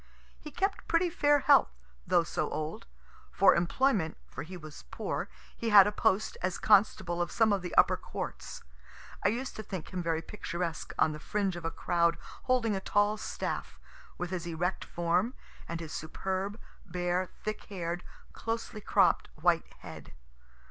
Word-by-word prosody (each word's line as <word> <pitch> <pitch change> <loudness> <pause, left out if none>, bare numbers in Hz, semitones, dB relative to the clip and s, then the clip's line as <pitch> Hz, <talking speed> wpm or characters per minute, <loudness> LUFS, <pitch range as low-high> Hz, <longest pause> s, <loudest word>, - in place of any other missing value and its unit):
He 305 - -9
kept 390 +6 -2
pretty 340 +1 +2
fair 290 -3 +3
health, 280 -2 +6 0.4
though 175 -1 +4
so - - -2
old. 155 0 -4 0.4
For - - +6
employment 175 - +1
for - - -8
he 180 +5 -7
was 155 - -10
poor - - -3 0.3
he 230 - -2
had 205 -3 +9
a 210 - +1
post 215 0 +1
as 185 0 -1
constable 190 -4 +3
of 175 - -1
some 220 -2 +3
of 195 - 0
the 180 -1 -5
upper - - +5
courts. - - -6 0.6
I - - +5
used 250 +5 -3
to - - -3
think 190 -4 -7
him 180 - -2
very 165 -1 -1
picturesque 170 -4 -4
on 155 - +4
the 150 - -6
fringe 195 +2 -1
of 175 -1 -7
a - - +1
crowd 170 0 +1 0.3
holding 235 -4 +2
a - - -1
tall 205 +2 +2
staff, - - -4 0.4
with 180 0 -4
his 175 -2 -3
erect 175 +3 -1
form, 175 +8 0 0.3
and 170 0 -3
his 160 -2 -7
superb, 190 +6 -3 0.2
bare, 180 0 -1
thick 215 0 -4
hair'd, 175 -2 -4 0.3
closely 225 -1 -4
cropt - - +3
white - - +1
head. - - -10
185 Hz, 165 wpm, -30 LUFS, 170-215 Hz, 0.6 s, had